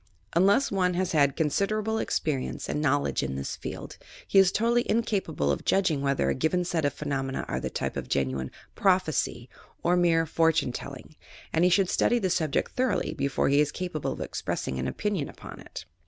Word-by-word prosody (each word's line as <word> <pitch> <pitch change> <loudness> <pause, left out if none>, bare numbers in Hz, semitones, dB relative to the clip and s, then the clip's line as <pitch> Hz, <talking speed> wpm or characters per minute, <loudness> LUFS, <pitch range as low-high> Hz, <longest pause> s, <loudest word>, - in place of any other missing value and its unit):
Unless 200 +10 +4
one 180 -2 +1
has 185 0 0
had 140 -3 +3
considerable 210 +8 0
experience 140 -5 -2
and 150 - -2
knowl 145 -1 +2
edge - - -1
in 65 0 -3
this 70 0 -4
field, - - -7 0.3
he 195 - +5
is 190 -1 +6
totally 235 +3 +2
incapable 205 - 0
of 70 - -2
judging 170 -7 +2
TFhether 140 -1 +1
a - - +2
given 165 +6 0
set 165 -3 -1
of 140 - +1
phenomena 135 -3 -3
are - - -2
of - - -3
the - - -3
tjTte - - -3
of - - -5
genuine 65 -1 -1 0.2
"prophecy" 180 - +1 0.4
or 175 +1 +3
mere 170 -2 +3
"fortune 160 -4 +2
telling," 140 +4 -8 0.4
and 160 - +3
he 180 - +5
should 190 +1 +3
study 240 - +2
the 190 -6 0
subject 155 -5 0
thoroughly 255 0 0
before 140 0 0
he 140 +1 +4
is 150 0 +1
capable 175 -4 -3
of - - -8
expressing 65 - -3
an 65 - -1
opinion 200 - -2
upon - - -11
it. - - -9
160 Hz, 195 wpm, -27 LUFS, 140-190 Hz, 0.4 s, is